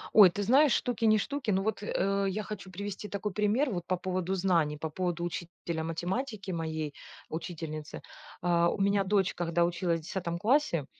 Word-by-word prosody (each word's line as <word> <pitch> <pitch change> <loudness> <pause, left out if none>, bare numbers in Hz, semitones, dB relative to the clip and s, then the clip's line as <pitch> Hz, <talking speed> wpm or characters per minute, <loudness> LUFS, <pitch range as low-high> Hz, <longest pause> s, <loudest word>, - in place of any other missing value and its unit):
Ой, 205 -4 +10
ты 205 +4 -3
знаешь, 270 +6 +5
штуки 235 -2 0
не 215 0 +6
штуки, 260 +2 -3
но 190 0 +1
вот, 220 0 -1
э, 195 0 0
я 210 +3 -2
хочу 200 -3 -7
привести 200 +2 -5
такой 200 0 -3
пример 215 +7 +2
вот 175 -4 -3
по 185 - +1
поводу 185 +1 -2
знаний, 170 -5 +2
по 160 +1 -4
поводу 175 0 -2
учителя 170 -1 -4
математики, 190 +6 -3
моей 160 -3 -3 0.4
учительницы. 160 -2 -5 0.4
А, 170 -1 +3
у - - -2
меня 200 0 +3
дочь, 195 -1 +2
когда 170 0 +1
училась 170 -1 0
в - - -19
10 170 0 -3
классе, 220 - +2
185 Hz, 180 wpm, -30 LUFS, 170-205 Hz, 0.4 s, Ой